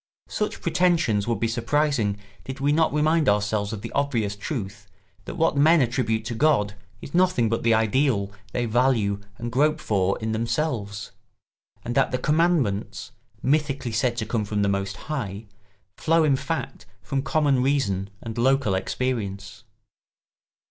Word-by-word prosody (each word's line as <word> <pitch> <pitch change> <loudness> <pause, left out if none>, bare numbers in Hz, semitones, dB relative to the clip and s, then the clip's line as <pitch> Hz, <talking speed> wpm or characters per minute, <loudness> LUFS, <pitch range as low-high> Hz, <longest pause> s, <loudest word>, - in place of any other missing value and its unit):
Such 210 - -3
pretensions 165 - +2
would 115 -4 0
be 115 - +1
surprising 120 -2 0 0.3
did 130 +1 -7
we 140 +1 +2
not 160 +2 +3
remind 155 0 +2
ourselves 105 0 0
of 110 -2 -6
the 115 - -6
obvious 115 -8 0
truth 100 -4 -5 0.4
that - - -6
what 165 -1 +2
men 160 +4 +5
attribute 115 -3 0
to 120 - -3
God 110 -6 +2 0.3
is 140 - -9
nothing 175 -10 +3
but 115 - -1
the 115 -1 +3
ideal 110 -2 +1 0.2
they 120 +3 -1
value 115 -4 +1 0.2
and 120 0 -5
grope 150 +5 +2
for 100 -2 0
in 110 0 -3
themselves, 110 -3 -2 0.7
and 120 - -2
that 135 +1 +3
the 125 - -1
commandments, 150 - 0 0.3
mythically 140 -3 0
said 120 +2 0
to 110 - -2
come 110 0 -1
from 105 0 -1
the - - +2
Most 100 0 -2
High, 115 -9 -4 0.5
flow 165 0 +3
in 145 -3 +3
fact 140 -5 -4 0.2
from 135 -1 -1
common 145 -3 +2
reason 100 -8 0
and 115 0 -5
local 130 -3 +2
experience. 100 -1 -3
120 Hz, 155 wpm, -24 LUFS, 105-145 Hz, 0.7 s, men